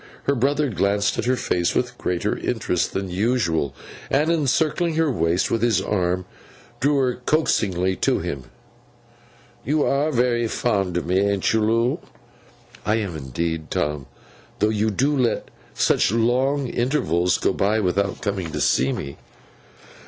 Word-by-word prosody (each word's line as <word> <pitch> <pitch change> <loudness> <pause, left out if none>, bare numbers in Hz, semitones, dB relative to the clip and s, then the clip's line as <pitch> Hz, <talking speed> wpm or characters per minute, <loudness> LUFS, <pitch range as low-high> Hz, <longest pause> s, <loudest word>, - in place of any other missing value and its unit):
Her 140 - +1
brother 145 +3 +1
glanced 100 0 +1
at - - -1
her 130 +1 +2
face 90 -7 0
with 125 0 0
greater 90 -1 -1
interest - - -1
than 95 -1 -3
usual, 90 - 0 0.3
and, 150 +4 +2
encircling 160 +2 +1
her 160 -2 +2
waist 85 -4 0
with 115 - +1
his 115 -4 +3
arm, 90 -2 -1 0.5
drew 145 +2 +2
her 130 -2 +1
coaxingly 95 - +1
to - - +2
him. 65 -3 -4 1.2
'You 150 +2 +1
are 145 +3 +1
very 120 -2 +1
fond 100 -6 0
of 85 - -2
me, 90 +2 +2
an't 100 0 +1
you, 110 - +2
Loo?' 115 +3 +1 0.8
'Indeed 85 - -2
I - - -13
am, 80 - -17
Tom, 75 -2 -2 0.5
though 105 - +2
you 110 0 +1
do 135 +8 +1
let 125 -4 0 0.3
such - - +2
long 130 +5 +1
intervals 105 - +1
go - - +1
by 105 +3 +1
without 100 0 0
coming 95 -5 -2
to - - -2
see 65 +2 +2
me. 70 - -5
105 Hz, 150 wpm, -23 LUFS, 90-130 Hz, 1.2 s, his